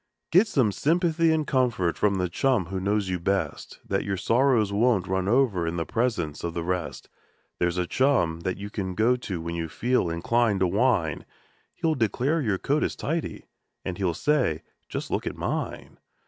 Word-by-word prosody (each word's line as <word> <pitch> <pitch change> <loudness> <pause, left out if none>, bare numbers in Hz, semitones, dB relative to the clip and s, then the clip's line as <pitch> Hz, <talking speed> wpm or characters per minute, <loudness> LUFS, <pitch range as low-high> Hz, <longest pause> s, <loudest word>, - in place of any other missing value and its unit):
Get 185 +7 +6
some 130 - +2
sympathy 165 - +2
and 155 -1 +1
comfort 120 -12 +1
from 100 -1 +2
the 90 -1 0
chum 120 +3 +1
who 95 +2 -4
knows 100 +1 0
you 90 -1 -1
best, 95 +3 -2
Then 95 0 0
your 100 -1 -2
sorrows 115 -2 +2
won't 105 -3 +2
run 95 0 -1
over 110 -8 +2
in 85 - -2
the 85 - -1
presence 105 -11 -1
of 85 -1 -3
the 85 - -2
rest; 90 -1 -3 0.5
There's 85 0 0
a 90 - +1
chum 105 -9 +1
that 95 +2 -3
you 100 +1 -7
can 95 -4 -4
go 115 +5 +3
to 95 -8 -5
when 85 +1 -4
you 85 -1 -3
feel 120 -5 0
inclined 105 +4 +1
to 95 - +4
whine, 95 - +1 0.5
He'll 165 -2 +1
declare 135 +5 0
your 105 -7 0
coat 145 +9 0
is - - -1
tidy, 160 +2 -3 0.4
and 90 0 -4
he'll 90 -4 0
say: 125 - +1 0.3
"Just - - -5
look - - -1
at - - -4
mine - - -4
100 Hz, 190 wpm, -26 LUFS, 90-130 Hz, 0.5 s, Get